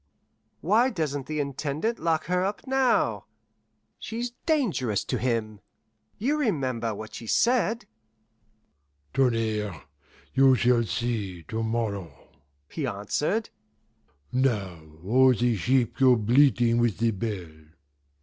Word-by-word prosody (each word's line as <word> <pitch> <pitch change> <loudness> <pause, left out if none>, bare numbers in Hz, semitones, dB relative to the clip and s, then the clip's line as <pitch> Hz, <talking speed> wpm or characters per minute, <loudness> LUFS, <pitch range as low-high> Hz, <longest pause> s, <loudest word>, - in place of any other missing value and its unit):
"Why 225 +9 +3
doesn't 150 - -3
the 155 -1 -3
Intendant 145 - -2
lock 160 -1 0
her 180 +1 0
up 200 +2 -3
now? 265 -2 +1 0.7
She's 235 +2 -4 0.2
dangerous 175 - +1
to - - -2
him. 110 -4 -1 0.6
You 285 +8 0
remember 130 - -1
what 110 +1 -9
she 115 - -8
said?" 235 - +2 1.3
"Tonnerre, 110 - 0 0.5
you 135 0 +5
shall 120 -1 +3
see 105 -4 -3
to 110 +9 -4
morrow," 105 - -3 0.4
he - - -4
answered; 150 - -2 0.8
"now 105 -10 0 0.2
all 130 +5 +5
the 120 0 +1
sheep 120 +4 +1
go 130 -2 +6
bleating 120 +1 +3
with 120 -4 +1
the 115 +1 +2
bell. 100 -5 -4
125 Hz, 110 wpm, -26 LUFS, 110-160 Hz, 1.3 s, go